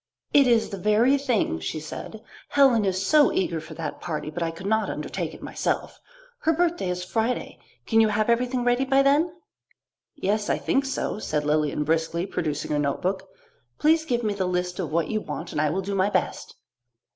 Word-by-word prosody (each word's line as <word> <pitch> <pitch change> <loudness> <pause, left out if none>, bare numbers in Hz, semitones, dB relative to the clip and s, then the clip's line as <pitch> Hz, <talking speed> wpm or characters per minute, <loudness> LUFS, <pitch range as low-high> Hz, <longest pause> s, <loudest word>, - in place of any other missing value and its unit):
"It 280 -2 +6
is 235 -2 +3
the 200 - -6
very 215 +7 +4
thing," 240 - 0
she 80 - -4
said. 210 +7 -8 0.3
"Helen 260 -7 +4
is 190 0 0
so 300 +1 +5
eager 165 -4 -1
for 160 0 -10
that 155 -2 -5
party, 155 -2 -4
but 175 - -5
I 165 - 0
could 165 +3 -9
not 220 +2 +1
undertake - - -4
it - - -13
myself. - - -2 0.4
Her 325 - +2
birthday 335 - 0
is 180 0 -2
Friday. 225 +6 -2 0.3
Can 225 -1 +4
you 220 - +5
have 215 0 0
everything 245 +1 +1
ready 245 +2 +2
by 270 +1 +3
then?" 295 +5 +3 0.8
"Yes, 210 -5 -1
I - - +2
think 275 +1 0
so," 265 -5 -2
said 150 -7 -1
Lilian 150 0 +1
briskly, 165 +3 0
producing 150 -6 -3
her 150 - +1
notebook. 185 +7 -1 0.5
"Please 315 +1 +3
give 245 -6 -1
me 210 -2 0
the 190 -2 -1
list 180 +1 -2
of 170 -5 -3
what 165 0 0
you 215 -1 -1
want 170 -3 -6
and 150 - -1
I 155 - +2
will 185 +6 -1
do 200 +2 -3
my 195 +1 +2
best." - - -2
200 Hz, 200 wpm, -25 LUFS, 165-245 Hz, 0.8 s, It